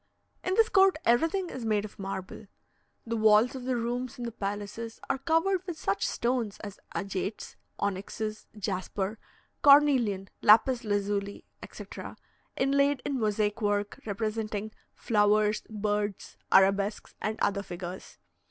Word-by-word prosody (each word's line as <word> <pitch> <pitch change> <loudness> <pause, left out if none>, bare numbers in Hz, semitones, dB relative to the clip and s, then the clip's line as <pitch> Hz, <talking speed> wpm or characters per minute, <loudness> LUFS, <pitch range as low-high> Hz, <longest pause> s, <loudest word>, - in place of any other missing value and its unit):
In 370 - 0
this 450 +1 +5
court, 385 -4 +5
everything 330 +10 +2
is 255 - -6
made 215 -2 +1
of 215 - -12
marble. 195 +2 -6 0.6
The 230 0 -2
walls 220 +2 +5
of 260 -2 -7
the 255 -1 0
rooms 240 +1 -3
in 245 - -6
the 235 - -4
palaces 205 +2 -5
are 265 - -2
covered 335 +6 +1
with 345 -3 -4
such 195 -6 0
stones 235 -4 -1
as 205 -2 -8 0.2
agates, 195 +1 -4 0.2
onyxes, 205 +2 -3
jasper, 195 +1 -3 0.4
cornelian, 265 -9 +5
lapis 235 +4 +5
lazuli, 205 -1 -2 0.2
etc., - - -9 0.4
inlaid 280 0 +2
in 280 -3 -1
mosaic 210 -1 0
work, 205 -1 -1
representing 215 0 -3 0.2
flowers, 210 -1 +2
birds, 210 -2 -2 0.2
arabesques, 195 +2 +3
and 215 +1 -2
other 200 0 +1
figures. 180 -1 -8
215 Hz, 130 wpm, -29 LUFS, 205-250 Hz, 0.6 s, this